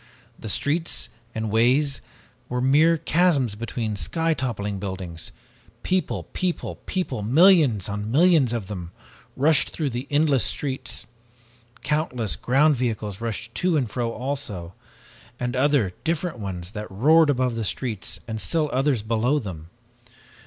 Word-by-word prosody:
The 110 - -6
streets 155 - 0 0.3
and 110 -1 -2
ways 130 +5 +3 0.5
were 125 - -1
mere 150 +6 +4
chasms 155 - +2
between 115 0 -3
the 100 - -5
sky 165 +6 +1
toppling 105 -8 -3
buildings! 95 -4 -6 0.5
People 185 0 0
people 180 -2 -2
people 175 - -1
millions 140 - +5
on 105 +1 -4
millions 155 -2 +4
of 115 -4 -2
them 90 -3 -7 0.4
rushed 145 +1 +4
through 150 -4 -2
the 125 +3 -4
endless 145 -5 +3
streets. 130 -5 -2 0.8
Countless 145 -8 0
ground 140 +4 +3
vehicles 110 -4 -3
rushed 115 0 -4
to 180 -3 +1
and 130 -5 0
fro 115 +2 -2
also, 120 -9 -4 0.7
and 125 +1 -2
other 130 -8 +2
different 165 -4 -2
ones 90 -3 -5
that 105 0 -6
roared 150 +10 +4
above 130 -3 +1
the 115 -1 -3
streets 110 0 -3
and 110 -1 -4
still 155 -3 0
others 130 -4 +1
below 115 +6 +1
them! 85 - -6
125 Hz, 140 wpm, -24 LUFS, 105-150 Hz, 0.8 s, millions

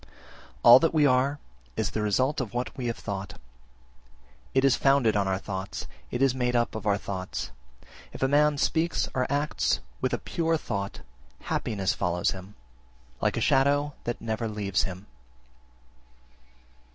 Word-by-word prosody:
2. - - -21 0.6
All 120 +2 +10
that 165 +2 +1
we 150 -2 +5
are 135 +2 +3 0.4
is - - 0
the 110 - -2
result 130 +8 +1
of 120 -2 -6
what 125 +1 -2
we 125 -2 -3
have 115 - -2
thought: 100 -2 -5 1.2
it 135 +1 +4
is 135 - +5
founded 135 -6 +3
on 100 -2 +1
our 95 0 +1
thoughts, 95 0 -5 0.2
it 125 +2 0
is 135 -2 +4
made 125 -1 0
up 120 0 +1
of 110 -1 -5
our 100 -1 +3
thoughts. 95 -2 -5 0.6
If - - -5
a - - +4
man 150 +1 +3
speaks 165 +4 +1
or 130 +1 -1
acts 145 +2 +1 0.2
with - - 0
a - - 0
pure 165 -1 0
thought, 100 -9 -4 0.4
happiness 100 -3 -1
follows 90 -2 0
him, 95 +2 -9 0.7
like - - +1
a - - -1
shadow 145 +2 +3
that 120 - -2
never 110 0 -2
leaves 100 -4 -1
him. 95 +2 -9
120 Hz, 165 wpm, -27 LUFS, 100-140 Hz, 1.2 s, All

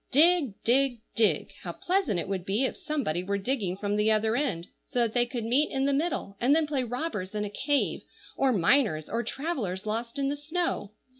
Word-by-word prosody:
Dig! 310 - +4
dig! 255 0 +3
dig! 225 -2 +2
How - - -5
pleasant 355 - 0
it - - -4
would 190 -2 -2
be 205 +8 +1
if - - -2
somebody 275 - -2
were 200 +2 -1
digging 200 -4 -1
from 205 0 -1
the 210 +1 +3
other 220 +1 +2
end, 240 - -1 0.2
so 275 - -6
that 230 -2 +1
they 245 -1 +2
could 240 -2 -4
meet 265 +6 +3
in 270 0 0
the 280 - +2
middle, 285 - -1
and 265 +5 +4
then 320 -1 +3
play 285 -3 -1
robbers 245 - -4
in 210 0 -1
a 205 - -6
cave, 285 +6 0 0.3
or 270 -1 +2
miners, 200 - +2
or 230 - -1
travellers 240 - -3
lost 230 +4 -3
in 275 -1 0
the 285 - 0
snow. 315 - -2
240 Hz, 210 wpm, -28 LUFS, 205-280 Hz, 0.3 s, Dig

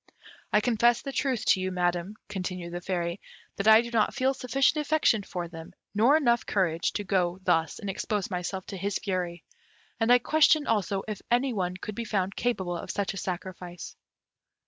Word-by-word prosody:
I 210 - +4
confess 235 +1 +3
the 275 - -4
truth 250 -2 -1
to 190 - +4
you, 185 0 -1
Madam," 175 +2 -1
continued 180 -3 -5
the 175 - -4
Fairy, 175 0 -2 0.4
"that 200 - -1
I 220 +1 +9
do 235 0 -7
not 225 -3 +1
feel 265 0 +2
sufficient 270 +4 +1
affection 295 -7 +2
for 180 -3 -5
them, 165 -1 -10 0.2
nor 235 +9 +5
enough 240 -6 +2
courage, 170 -4 0
to 205 - -2
go 185 -3 0
thus 165 -2 +1
and 205 - -7
expose 205 +1 -2
myself 185 +1 -3
to 195 - -7
his 195 +1 -1
fury, 180 -3 -3 0.6
and 225 +1 +3
I 245 - +9
question, 310 +3 +4
also, 200 -3 0
if 210 -2 -5
any 245 +2 +2
one 180 -3 -2
could 210 +3 -6
be 235 - -4
found 195 -2 -1
capable 190 -8 -1
of - - -8
such 200 -1 -1
a - - -7
sacrifice." 180 -1 -6
200 Hz, 190 wpm, -28 LUFS, 180-235 Hz, 0.6 s, I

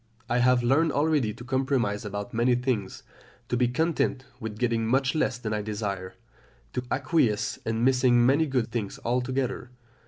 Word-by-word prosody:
I 120 0 +1
have 125 0 +4
learned 145 +5 +3
already 145 -6 +2
to 115 +3 -10
compromise 130 -5 0
about 100 +3 -5
many 120 +2 +3
things, 120 -6 -2 0.5
to - - 0
be 120 0 +2
content 135 -1 0
with 110 -3 -6
getting 115 -1 0
much 130 +2 +2
less 145 -5 0
than 110 -3 -4
I 105 - -1
desire, 100 -3 -4 0.6
to 125 - -2
acquiesce 130 -8 +1
in 115 +1 0
missing 125 -2 +4
many 145 +5 +3
good 130 -4 -1
things 110 -5 -4
altogether. 125 +1 -1
125 Hz, 160 wpm, -27 LUFS, 110-130 Hz, 0.6 s, have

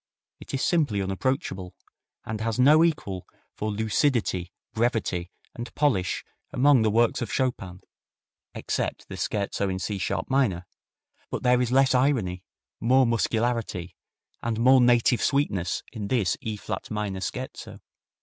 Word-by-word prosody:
It - - -10
is 135 - -2
simply 145 - +2
unapproachable, 95 -2 -2 0.5
and 110 0 -4
has 115 0 -1
no 150 +5 +6
equal 100 - -1 0.3
for 110 - -3
lucidity, 110 - 0 0.2
brevity 110 -7 0 0.2
and 120 +1 -7
polish 110 -12 +1 0.3
among 135 -1 +4
the 110 - +3
works 115 +2 +2
of 120 - -3
Chopin, 95 -9 -2 0.7
except - - -3
the - - -6
Scherzo 100 -1 -1
in 95 - -2
C 100 +1 -3
sharp 95 - -2
minor; 115 -10 +1 0.6
but - - -4
there 125 0 +4
is 125 -1 0
less 135 0 +4
irony, 120 -9 +1 0.4
more 130 +4 +4
muscularity, 115 -5 -1 0.5
and 115 -1 -2
more 130 +2 +6
native 120 0 +4
sweetness 105 - 0
in 105 -2 -4
this 105 -6 +1
E 110 -4 -3
flat - - -5
minor 105 -3 -3
Scherzo. - - -6
115 Hz, 140 wpm, -26 LUFS, 95-130 Hz, 0.7 s, no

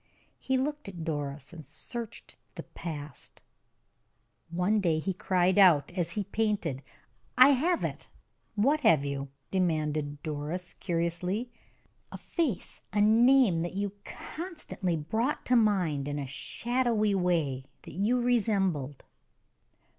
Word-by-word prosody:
He 265 0 0
looked 295 0 -2
at 175 -4 -7
Doris 145 -2 -4
and 165 -2 -9
searched 225 - -7 0.2
the - - -6
past. 150 -4 -8 1.1
One 180 +6 +1
day 165 -4 +2
he 190 +5 -1
cried 185 +1 +2
out, 175 -7 +6
as 175 -2 -2
he 210 - -1
painted: 200 -11 -1 0.6
"I 255 +2 +9
have 320 +6 +2
it!" - - -4 0.5
"What 280 +9 +2
have 155 - +4
you?" 140 0 -3 0.2
demanded 155 -5 -1
Doris, 155 +4 -4
curiously. 180 +6 -2 0.6
"A - - -6
face, 305 - -3
a 205 - 0
name, 225 -3 +5
that 175 +2 -4
you 200 0 -1
constantly 310 - -5
brought 220 - -1
to 250 - +3
mind 180 - +2
in 145 0 -3
a 140 - -3
shadowy 230 - 0
way 165 -8 0 0.2
that - - -10
you 215 +8 +1
resembled." 195 - 0
185 Hz, 125 wpm, -29 LUFS, 155-230 Hz, 1.1 s, I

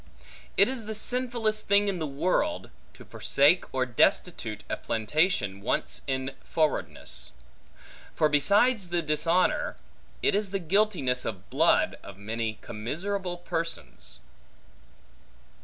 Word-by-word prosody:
It 200 - +6
is 255 -4 -4
the 220 0 -5
sinfullest 235 -2 -1
thing 200 +1 +4
in 195 -3 -1
the 155 - -2
world, 185 - -1 0.2
to - - -13
forsake 145 +6 +2
or 130 -1 0
destitute 125 -3 +1
a - - -1
plantation 110 - 0
once 105 - -1
in 130 0 -2
forwardness; 155 -2 -2 0.8
for 155 - +4
besides 200 - +3
the 175 -1 0
dishonor, 170 - +1 0.5
it - - +3
is 205 0 +1
the 195 - -1
guiltiness 175 -8 +1
of 95 -5 -6
blood - - +3
of 100 - -11
many 110 +1 -3
commiserable 175 - -3
persons. 165 -1 -5
170 Hz, 120 wpm, -27 LUFS, 130-205 Hz, 0.8 s, It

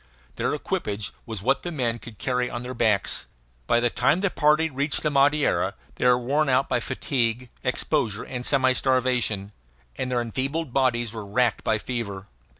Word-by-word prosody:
Their - - 0
equipage 105 -1 -3 0.2
was 110 -4 -6
what 135 - +2
the 175 - -4
men 120 -6 -1
could 115 -3 -11
carry 125 -1 -1
on 120 0 -5
their 125 +1 -5
backs. 110 -5 +1 0.4
By 120 - +4
the 120 0 +1
time 135 +8 +2
the 200 -2 +1
party 150 +1 +3
reached 140 0 -1
the 150 - +1
Madeira 145 +1 +2 0.2
they - - +2
were 125 0 +6
worn 140 +4 +1
out 130 +1 +3
by 125 - +1
fatigue, 120 0 -1
exposure, 125 -4 0
and 125 -1 -5
semi 130 -1 +4
starvation, 125 -6 +1 0.4
and 130 - -3
their 125 - +1
enfeebled 135 +5 -3
bodies 120 -4 +1
were 110 -2 -6
racked 115 +2 +1
by 110 - +2
fever. 105 -4 -5
125 Hz, 175 wpm, -25 LUFS, 115-135 Hz, 0.4 s, were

